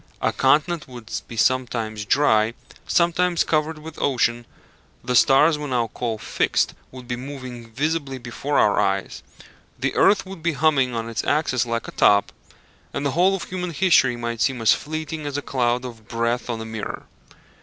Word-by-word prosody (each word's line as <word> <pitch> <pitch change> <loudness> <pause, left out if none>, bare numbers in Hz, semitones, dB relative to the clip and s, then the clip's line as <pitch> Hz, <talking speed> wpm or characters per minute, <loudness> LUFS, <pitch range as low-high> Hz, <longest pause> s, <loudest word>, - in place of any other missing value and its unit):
A - - 0
continent 150 +5 +2
would 120 -3 -11 0.2
be 115 - -9
sometimes 115 -4 0
dry, 110 -4 +3 0.3
sometimes 175 0 +2
covered 155 0 0
with 155 +1 -9
ocean; 120 -3 +1 0.6
the 125 - -2
stars 150 +6 +5
we 150 - -4
now 120 -4 0
call 115 -3 -2
fixed - - 0 0.2
would 125 -1 -11
be 125 - -2
moving 125 -3 -8
visibly 140 +1 -2
before 130 +4 -3
our 105 - +4
eyes; 95 0 -1 0.6
the - - -1
earth 200 - +4
would 190 -3 -9
be 170 0 0
humming 135 -5 +2
on 115 0 -3
its 115 -1 -3
axis 130 -5 +1
like 115 0 -2
a - - -6
top, 100 0 +3 0.6
and 140 - -2
the 140 - +1
whole 180 +6 +3
of 190 - -5
human 180 -1 -4
history 145 -7 +4
might 120 -1 -4
seem 130 -1 +1
as 115 -1 +5
fleeting 155 0 -5
as 145 0 -3
a - - -2
cloud 125 -1 0
of 115 -3 -10
breath 115 +1 -1
on 115 -2 -2
a - - -6
mirror. 110 -2 -6
130 Hz, 175 wpm, -23 LUFS, 115-155 Hz, 0.6 s, stars